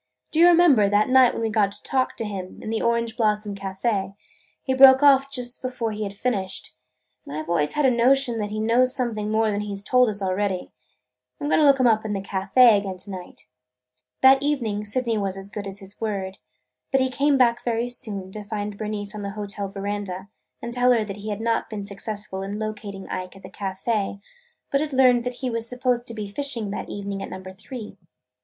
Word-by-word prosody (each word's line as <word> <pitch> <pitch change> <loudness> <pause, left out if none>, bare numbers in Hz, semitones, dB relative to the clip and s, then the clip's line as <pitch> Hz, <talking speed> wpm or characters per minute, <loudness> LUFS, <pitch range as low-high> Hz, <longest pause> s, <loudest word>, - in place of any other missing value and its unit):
"Do 315 - 0
you 345 - +8
remember, 330 -12 +5
that 205 +3 +2
night 255 -1 +6
when - - -3
we 225 - 0
got 215 -2 +3
him 200 - -6
to - - -12
talk, 260 -1 -1
in 205 -1 -5
the 225 - -1
Orange 235 -1 0
Blossom 210 -3 0
Café, 195 0 -2 0.5
he 260 - 0
broke 265 +1 +8
off 275 -1 +6 0.3
before 250 -3 -3
he 210 0 -5
had 200 -1 -4
finished, 195 - -3 0.5
and 145 - -7
I 155 - -3
've - - -16
always 150 -3 +1
had 300 - +1
a 260 - +5
notion 245 0 +3
that 210 -1 -2
he 215 +1 -4
knows 240 +3 +3
something 220 -5 -1
more 220 0 +2
than 205 0 -1
he 205 -1 -4
's 195 - -6
told 250 +2 +4
us 205 -1 -1
already. 190 -1 -1 0.7
I - - -8
'm 290 - -1
going - - +4
to - - +5
look 275 -1 +5
him 255 - +3
up 220 -2 +4
in 215 -1 -3
the 200 - -1
café 200 +4 +4
again 195 -2 -5
to 195 +2 -8
night." 185 -2 -9 0.8
That 265 +1 +7
evening 235 -8 -1
Sydney 230 +1 -1
was 195 -1 -2
as 195 +1 -7
good 205 -1 -6
as 195 0 -5
his 195 0 -11
word. 195 -3 -3 0.5
But 270 - +3
he 260 - +2
came 280 +2 +2
back 240 -2 +3
very 235 0 0
soon 200 -6 -6
to 210 +1 -7
find 205 -1 -5
Bernice 210 -1 -3
on 210 - -6
the 200 - -4
hotel 205 -1 -4
veranda 195 -1 -5 0.3
and 235 - -5
tell 250 0 +4
her 230 -2 +2
that 200 -1 -7
he 210 +1 -6
had 205 +1 -3
not 230 0 0
been 205 -2 -5
successful 205 -1 -6
in 200 +2 -4
locating 210 -2 -6
Ike 185 0 -5
at 195 - -15
the 185 - -10
café 200 +1 -2 0.5
but 275 - +2
had 305 -2 -3
learned 250 -2 +4
that 250 0 -3
he 250 - -1
was 230 0 -3
supposed 250 -1 -1
to 230 - -4
be 210 -2 -4
fishing 230 -2 -2
that 205 - -5
evening 200 -1 -5
at - - -6
Number 185 0 -8
Three. 210 0 -9
215 Hz, 225 wpm, -24 LUFS, 200-245 Hz, 0.8 s, you